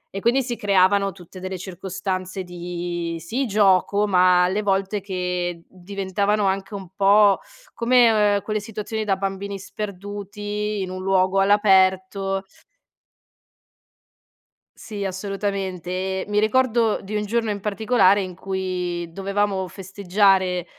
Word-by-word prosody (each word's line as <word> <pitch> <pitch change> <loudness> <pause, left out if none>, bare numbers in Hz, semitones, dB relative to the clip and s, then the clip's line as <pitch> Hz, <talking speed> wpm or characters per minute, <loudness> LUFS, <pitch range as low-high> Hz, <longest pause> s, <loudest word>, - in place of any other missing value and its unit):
e - - -2
quindi 250 +5 +2
si 240 -1 -3
creavano 195 -1 +3
tutte 185 0 -13
delle 185 0 -5
circostanze 185 +1 -5
di, 175 -1 -5
sì, 235 - -2
gioco, 200 0 +3
ma 180 -2 +4
alle 190 +4 0
volte 195 0 0
che 180 -3 -3
diventavano 200 +2 -2
anche 195 +2 -1
un 195 -2 -7
po' 200 0 +5 0.3
come 240 0 +4
o 220 - +1 0.2
ehm, 200 - 0
quelle 215 -1 -2
situazioni 215 0 -5
da 195 -2 +2
bambini 195 +1 -4
sperduti 205 +1 -5
in 185 - -5
un 185 0 -6
luogo 190 0 +2
all'aperto 195 -1 +3 2.3
Sì, 205 -3 -6
assolutamente. 195 -2 -3
E 190 +1 -2
mi 210 0 +2
ricordo 230 0 +2
di 210 +2 -6
un 210 - -1
giorno 225 0 0
in 205 - -3
particolare 205 -1 +3
in 185 - -7
cui 180 -2 -3
dovevamo 195 +1 -1
festeggiare, 190 -1 +1
195 Hz, 125 wpm, -22 LUFS, 185-205 Hz, 2.3 s, po